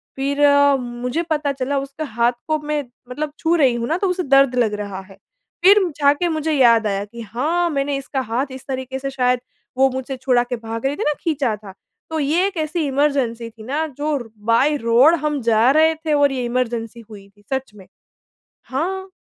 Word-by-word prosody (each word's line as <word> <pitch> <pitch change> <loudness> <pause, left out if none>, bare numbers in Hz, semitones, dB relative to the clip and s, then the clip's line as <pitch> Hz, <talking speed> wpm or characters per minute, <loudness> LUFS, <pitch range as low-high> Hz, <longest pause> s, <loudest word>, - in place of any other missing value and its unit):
फ़िर 280 +2 -1
अ, 285 0 +5
मुझे 245 +4 -3
पता 300 -2 0
चला 275 +1 -2
उसका 275 +3 -6
हाथ 235 -2 +1 0.2
को 310 - +1
मैं 300 0 -2 0.3
मतलब 295 +4 -4
छू 325 +1 +1
रही 270 -7 +3
हूँ 235 0 -2
ना 330 - 0
तो 390 - 0
उसे 360 0 -1
दर्द 275 -2 +4
लग 230 -4 +1
रहा 200 -2 -5
है, 195 0 -16 0.5
फ़िर 400 +3 +8 0.2
जाके 285 +5 +3
मुझे 315 -1 -1
याद 235 -6 +4
आया 200 0 -2
कि 235 +3 -10
हाँ 295 - -1
मैंने 280 -2 -1
इसका 270 0 -3
हाथ 245 +2 -1
इस 260 -1 -10
तरीके 260 0 -4
से 275 - -4
शायद 250 -2 +1 0.4
वो 265 +1 +5
मुझसे 260 +1 -4
छुड़ा 250 -1 +2
के 245 0 -4
भाग 225 +1 -6
रही 280 - 0
थी 420 - -3
ना 300 - +2
खींचा 275 -9 0
था। 205 -2 -12 0.4
तो 320 0 -2
ये 310 +6 +2
एक 395 - -7
ऐसी 315 0 -2
इमरजेंसी 265 -5 0
थी 220 -1 -14
ना 290 +7 -1
जो 300 +1 -1
र 240 -4 -8 0.2
बाय 245 +6 +3
रोड 245 +6 +5
हम 300 -2 -1
जा 230 +1 +3
रहे 315 +2 +4
थे 315 -1 -2
और 285 -1 +4
ये 255 -2 -2
इमरजेंसी 235 -2 -3
हुई 200 -2 -12
थी 205 +1 -26
सच 265 -2 -3
में। 195 -3 -15 0.8
हाँ। 375 +8 -3
270 Hz, 210 wpm, -20 LUFS, 235-300 Hz, 0.8 s, फ़िर